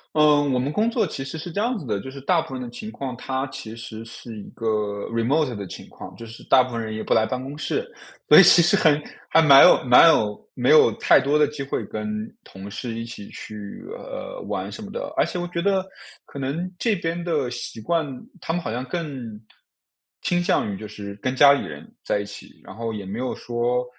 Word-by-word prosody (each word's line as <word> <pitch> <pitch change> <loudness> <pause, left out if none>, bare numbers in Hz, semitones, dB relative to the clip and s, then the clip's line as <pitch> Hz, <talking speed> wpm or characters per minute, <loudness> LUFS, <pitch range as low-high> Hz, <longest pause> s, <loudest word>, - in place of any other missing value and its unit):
嗯， 150 -2 +4
我 130 - +1
们 135 +4 -1
工 215 +7 +2
作 235 0 +1
其 135 - -5
实 135 +4 -6
是 170 +3 -7
这 200 - -2
样 240 +2 0
子 170 - -8
的， 105 -4 -2
就 130 - -8
是 135 - -9
大 170 +4 +2
部 - - -9
分 130 - -5
的 - - -6
情 215 - -8
况 130 - -5
它 130 +2 -3
其 110 -4 -8
实 115 -1 -8
是 115 0 -10
一 - - -10
个 115 - -7 0.5
Remote 125 +3 +1
的 100 -2 -6
情 - - -10
况， - - -11
就 115 - -10
是 115 0 -11
大 130 - +6
部 125 - -7
分 115 -1 -2
人 110 -1 -5
也 110 - -4
不 - - +1
来 110 - +3
办 130 -1 -3
公 135 +2 -7
室。 430 - -2 0.4
所 - - +9
以 - - +10
其 - - +8
实 185 +5 +4
很 155 -6 +4 0.3
还 - - +5
蛮 140 -4 +8
有 - - +6
蛮 125 +5 +7
有 105 -8 0
没 125 +3 +2
有 155 -6 +7
太 - - +4
多 145 +2 +1
的 150 - +4
机 150 -1 -7
会 135 - -3
跟 - - -5 0.4
同 95 +1 -10
事 115 +1 -5
一 115 0 -4
起 110 -3 -9
去， 105 -2 -9 0.2
呃， - - -7
玩 - - -3
什 - - -8
么 - - -8
的， - - -6
而 - - +4
且 180 - -4
我 175 - -3
觉 170 -1 -2
得 190 0 +1 0.4
可 140 - -9
能 160 +7 -3
这 225 0 +1
边 170 -1 -3
的 150 -7 -1
习 120 -1 -6
惯， 165 +9 0 0.4
他 - - -3
们 175 - 0
好 - - -3
像 125 +2 -3
更 135 -10 -5 0.8
倾 175 0 +1
向 105 - +1
于 - - -4
就 105 +2 -8
是 100 -1 -8
跟 130 0 -1
家 140 +1 +8
里 140 - -1
人 75 -2 -10 0.2
在 - - 0
一 100 - -4
起， 105 - -12
然 - - -11
后 115 0 -4
也 100 -2 -6
没 100 +5 -5
有 130 0 -2
说 120 +1 -1
130 Hz, 275 characters per minute, -23 LUFS, 115-165 Hz, 0.8 s, 以